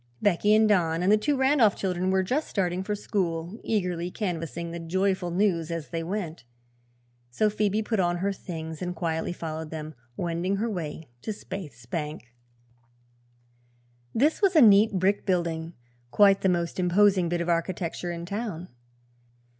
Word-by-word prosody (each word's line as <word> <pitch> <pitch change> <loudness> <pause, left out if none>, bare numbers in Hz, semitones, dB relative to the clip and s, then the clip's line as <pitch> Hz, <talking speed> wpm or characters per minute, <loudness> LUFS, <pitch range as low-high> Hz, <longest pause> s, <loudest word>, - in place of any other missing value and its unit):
Becky 205 +2 +3
and 220 0 +5
Don 170 -5 +2
and 190 - +3
the - - +7
two 280 +6 0
Randolph 265 -6 +4
children 185 -1 -1
were 190 0 +2
just 270 +11 -1
starting 180 -2 -1
for 210 +2 -2
school, 180 -1 -2
eagerly 180 -5 -1
canvassing 170 -3 -4
the 170 - -5
joyful 185 +2 0
news 175 -3 +1
as 165 -2 -4
they 165 -1 -3
went. 170 -3 -4 0.9
So 210 - +1
Phoebe 210 +1 0
put 220 -1 -1
on 175 -1 +1
her 200 +3 -1
things 160 -4 -7
and 180 0 -3
quietly 160 -1 -2
followed 160 -2 -5
them, 155 0 -6 0.2
wending 175 +3 -1
her 220 +3 -1
way 160 -4 -5
to - - -6
Spaythe's 155 - -7
bank. 150 -3 -5 1.8
This 295 - +2
was 390 -3 +3
a - - +8
neat 215 -1 +7
brick 190 +2 +1
building, 170 -3 -1 0.4
quite 195 +6 +5
the 190 - +3
most 170 0 -1
imposing 185 0 +3
bit 175 0 0
of 170 - -2
architecture 170 0 -1
in 170 0 -5
town. 200 -3 -4
180 Hz, 160 wpm, -27 LUFS, 165-205 Hz, 1.8 s, a